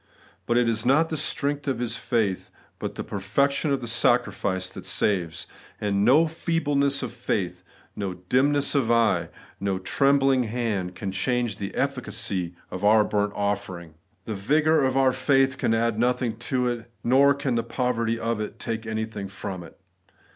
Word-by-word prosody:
But 120 - +2
it 120 -1 +3
is 110 -1 +1
not 150 +6 +3
the 160 - -2
strength 145 -1 -1
of 135 -4 0
his 120 -1 -1
faith, 110 -5 -1 0.3
but - - -4
the - - -4
perfection 140 +10 0
of 140 - 0
the 120 - -5
sacri 120 -2 +2
fice, 95 -1 -2
that - - -9
saves; 90 -6 0 0.3
and 100 -1 0
no 140 +9 +6
feebleness 145 -4 0
of - - -5
faith, - - -2 0.3
no 95 -3 -3
dim 125 +11 +2
ness 145 -1 +1
of 135 -6 +1
eye, 115 -3 +2 0.3
no 100 -1 -1
trembling 135 +5 +2
of - - -6
hand, 105 -6 -2
can 100 -2 -4
change 120 +2 -1
the 100 -2 -4
efiicacy 100 -10 -2 0.2
of 95 - -6
our 105 +1 +6
burnt 105 -1 -1
oflfering. 100 -5 -3 0.3
The 110 - -4
vigour 150 +9 +2
of 130 0 0
our 130 -1 +4
faith 135 -1 +2
can 115 - +2
add 115 -1 0
nothing 125 -1 +1
to 125 -2 +1
it, 120 -1 -4
nor 140 +3 +5
can 140 -2 -2
the 115 - +1
poverty 115 -1 -1
of 115 -1 -2
it 105 - -5
take 115 0 -4
anything 110 -2 -4
from 95 -1 -6
it. 85 - -14
115 Hz, 175 wpm, -25 LUFS, 100-135 Hz, 0.3 s, no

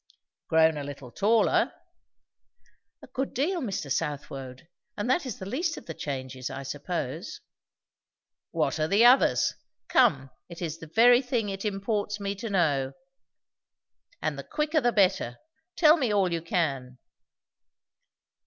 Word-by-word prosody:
"Grown 160 -1 +4
a 145 - -4
little 140 -3 -8
taller." 220 - +2 1.3
"A - - -11
good 270 +1 -3
deal, 335 +8 0
Mr. 195 - -4
Southwode! 140 -2 -4 0.3
And 205 - -2
that 290 0 +1
is 235 - -5
the 190 - -7
least 315 - -2
of - - -10
the 165 - -6
changes, 130 -4 -5
I - - -6
suppose." 130 - -4 1.1
"What - - -1
are 155 - +1
the 200 +7 +4
others? 250 +2 +5 0.4
Come, 215 - +3 0.2
it 170 - -10
is 165 -2 -4
the 165 - -10
very 240 +8 +6
thing 240 -5 -1
it 195 +1 -5
imports 205 0 -2
me 200 0 -2
to 225 +3 -5
know. 145 -8 +1 1.3
And - - -1
the - - -5
quicker 305 0 0
the 240 - +2
better. 190 - +2 0.4
Tell 315 0 +6
me 255 -8 0
all 195 -4 +2
you 165 - -1
can." 140 -7 -2
195 Hz, 145 wpm, -27 LUFS, 145-240 Hz, 1.3 s, very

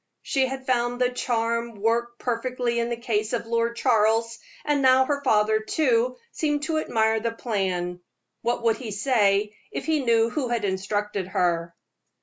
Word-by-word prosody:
She 265 -2 +1
had 265 0 -6
found 245 -1 0
the 250 0 +2
charm 235 -1 -1
work 235 +3 0
perfectly 245 0 -1
in 235 0 -1
the 235 - -2
case 220 -2 -1
of 235 - -1
Lord 230 0 0
Charles, 230 -1 +2 0.3
and 295 -1 +1
now 260 0 +5
her 285 0 -1
father, 215 -3 +3
too, 250 0 +1
seemed 295 -2 -1
to 315 0 0
admire 220 -5 +1
the 230 +1 -2
plan. 185 -6 -2 0.4
What 240 0 -1
would 225 -1 +2
he 245 -4 -7
say 210 -2 +1 0.2
if - - -5
he 310 -3 +1
knew 230 -1 +3
who 270 -1 -1
had 235 -3 -1
instructed 200 0 -2
her? 170 -2 0
230 Hz, 165 wpm, -25 LUFS, 215-250 Hz, 0.4 s, now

